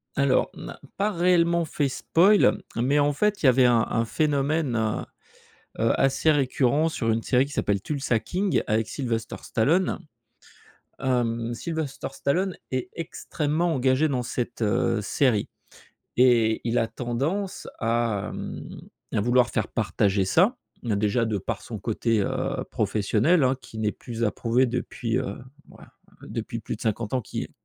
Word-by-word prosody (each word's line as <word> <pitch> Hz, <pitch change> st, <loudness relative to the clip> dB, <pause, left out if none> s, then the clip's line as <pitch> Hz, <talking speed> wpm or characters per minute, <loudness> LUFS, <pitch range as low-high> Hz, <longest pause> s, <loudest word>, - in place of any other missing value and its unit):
Alors, 140 Hz, -2 st, +2 dB
on -, -, -10 dB
n'a -, -, -8 dB, 0.2 s
pas 205 Hz, +2 st, +2 dB
réellement 170 Hz, -2 st, +3 dB
fait 145 Hz, -2 st, -1 dB
spoil, 185 Hz, +9 st, +3 dB, 0.2 s
mais, 135 Hz, +5 st, +2 dB
en 145 Hz, 0 st, +3 dB
fait, 210 Hz, +5 st, 0 dB
il -, -, +4 dB
y -, -, +8 dB
avait 130 Hz, 0 st, +5 dB
un 120 Hz, -2 st, +5 dB
un 115 Hz, -, +1 dB
phénomène, 145 Hz, 0 st, 0 dB
heu, 110 Hz, -1 st, -1 dB, 0.7 s
heu, 115 Hz, +1 st, +3 dB
assez 135 Hz, +4 st, +3 dB
récurrent 140 Hz, +2 st, +2 dB
sur 115 Hz, -8 st, -1 dB
une 115 Hz, +1 st, 0 dB
série 130 Hz, +3 st, +2 dB
qui 145 Hz, -, -11 dB
s'appelle 100 Hz, -7 st, 0 dB
Tulsa 135 Hz, -2 st, -1 dB
King 185 Hz, -, 0 dB
avec 110 Hz, 0 st, 0 dB
Sylvester 115 Hz, -5 st, -3 dB
Stallone. 165 Hz, +12 st, +1 dB, 1.0 s
Hem, 120 Hz, -3 st, 0 dB
Sylvester 160 Hz, -1 st, -4 dB
Stallone 180 Hz, +8 st, 0 dB, 0.2 s
est 130 Hz, -1 st, -2 dB
extrêmement 160 Hz, 0 st, -2 dB
engagé 130 Hz, +3 st, +2 dB
dans 125 Hz, -3 st, 0 dB
cette, 120 Hz, 0 st, -4 dB
heu, 105 Hz, +1 st, +1 dB
série 115 Hz, -1 st, +1 dB, 0.7 s
et 120 Hz, -3 st, +4 dB
il 120 Hz, +1 st, +1 dB
a 115 Hz, -, +1 dB
tendance 135 Hz, -, -3 dB
à, 115 Hz, -3 st, 0 dB
hem, -, -, -7 dB, 0.3 s
à 105 Hz, -, +1 dB
vouloir 120 Hz, +2 st, +3 dB
faire 110 Hz, -2 st, -1 dB
partager 100 Hz, -3 st, +1 dB
ça. 190 Hz, -, +3 dB, 0.3 s
Heu, 105 Hz, -3 st, +1 dB
déjà 105 Hz, +3 st, +1 dB
de 110 Hz, -, -1 dB
par 95 Hz, -, -4 dB
son 110 Hz, -, -7 dB
côté, 115 Hz, +1 st, 0 dB
heu, -, -, -2 dB
professionnel, 115 Hz, -, +2 dB
hein, 130 Hz, +1 st, +3 dB
qui 120 Hz, -2 st, -11 dB
n'est 105 Hz, -1 st, 0 dB
plus 115 Hz, -1 st, -5 dB
à 105 Hz, -, +2 dB
prouver 120 Hz, +4 st, +1 dB
depuis, 120 Hz, -1 st, -2 dB
heu, 130 Hz, -, -3 dB, 0.3 s
bah, -, -, -16 dB, 0.3 s
depuis -, -, -5 dB
plus -, -, -5 dB
de -, -, -22 dB
50 110 Hz, 0 st, -2 dB
ans, 130 Hz, -, +2 dB
qui -, -, -5 dB
est -, -, -12 dB
125 Hz, 165 wpm, -25 LUFS, 115-150 Hz, 1.0 s, y